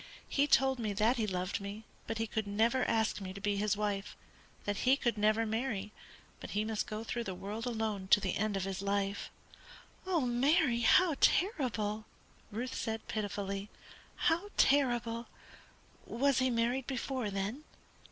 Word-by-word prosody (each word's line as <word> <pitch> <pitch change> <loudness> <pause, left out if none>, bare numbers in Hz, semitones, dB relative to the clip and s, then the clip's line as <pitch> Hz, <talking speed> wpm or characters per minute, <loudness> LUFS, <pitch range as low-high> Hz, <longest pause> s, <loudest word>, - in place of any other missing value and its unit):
He 285 +1 +2
told 265 -2 +4
me 215 -3 -1
that 220 +5 +2
he 220 -2 0
loved 185 0 -2
me, 200 +2 -6 0.2
but 225 - -2
could 220 -2 -1
never 230 +5 +2
ask 220 -2 +1
me 185 -1 -5
to 200 - -8
be 205 0 0
his 210 0 +1
wife; 205 -1 -2 0.5
that 205 -1 -1
he 260 +5 +4
could 240 -5 0
never 215 +2 +2
marry, 220 -2 -2 0.5
but - - -8
he 210 - +1
must 220 -1 -2
go 215 +1 -4
through 235 +1 -3
the 190 - -4
world 210 +6 -5
alone 220 -5 -2
to 205 - +6
the 195 -2 -1
end 210 -1 0
of 190 - -2
his 190 0 -3
life." 200 0 -1 0.8
"Oh, 355 -4 +2
Mary, 250 +1 +3
how 320 +6 +5
terrible!" 220 - +1 0.4
Ruth 240 +4 -4
said, 225 -1 -3
pitifully, 200 -1 -3 0.5
"how 345 +4 +1
terrible! 240 -4 +2 0.8
Was 270 +2 +2
he 260 0 +3
married 240 +2 0
before, 260 -3 -2
then?" 200 +8 -3
220 Hz, 160 wpm, -33 LUFS, 205-250 Hz, 0.8 s, to